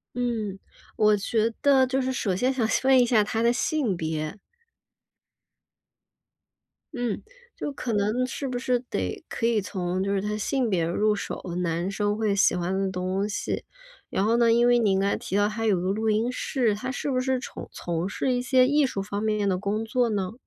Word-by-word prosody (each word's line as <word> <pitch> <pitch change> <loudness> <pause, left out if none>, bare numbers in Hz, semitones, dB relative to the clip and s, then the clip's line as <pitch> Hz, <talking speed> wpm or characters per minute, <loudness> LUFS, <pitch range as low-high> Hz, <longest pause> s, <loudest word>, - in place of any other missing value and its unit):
嗯， 225 -5 -2 0.4
我 210 -1 +4
觉 220 +2 0
得 270 -2 +5
就 265 +1 0
是 260 0 -1
首 200 -6 -1
先 255 +7 +1
想 240 -4 0 0.2
问 265 -1 +6
一 245 - +6
下 230 -3 +4
他 220 +2 -1
的 235 +1 +4
性 245 - 0
别。 160 +3 -3 2.6
嗯， 245 -4 -2 0.3
就 - - -4
可 250 -4 -4
能 215 +5 +1
是 270 +2 -4
不 245 -1 -2
是 250 -1 0
得 95 - -4
可 230 - -2
以 230 -3 +2
从 185 -1 -2
就 200 +1 0
是 195 - 0
他 210 0 -2
性 245 +1 0
别 170 -4 +1
入 210 +5 +2
手， - - -5 0.2
男 170 +2 -1
生 205 +1 0
会 215 -2 +1
喜 200 - +4
欢 180 +2 -1
的 195 -1 0
东 185 +2 -2
西。 205 - -3 0.4
然 195 - 0
后 230 +2 +3
呢， 235 -1 +4
因 235 +1 +4
为 245 0 +5
您 200 -4 +2
刚 200 +1 +1
才 - - +1
提 195 - -3
到 205 0 +4
他 225 +1 -3
有 200 -4 +3
个 185 +2 -1
录 220 +2 -1
音 225 +4 +1
室， 240 -5 0
他 255 +5 -4
是 280 +1 -3
不 255 -1 +1
是 260 0 0
重 - - -8
从 170 +2 -3
事 255 +5 -1
一 245 - +1
些 255 0 +4
艺 290 0 +3
术 195 -6 -3
方 205 +1 -4
面 215 -2 0
的 185 -2 +1
工 210 +3 -2
作 240 +2 +1
呢？ 200 -2 -2
215 Hz, 220 characters per minute, -26 LUFS, 195-245 Hz, 2.6 s, 问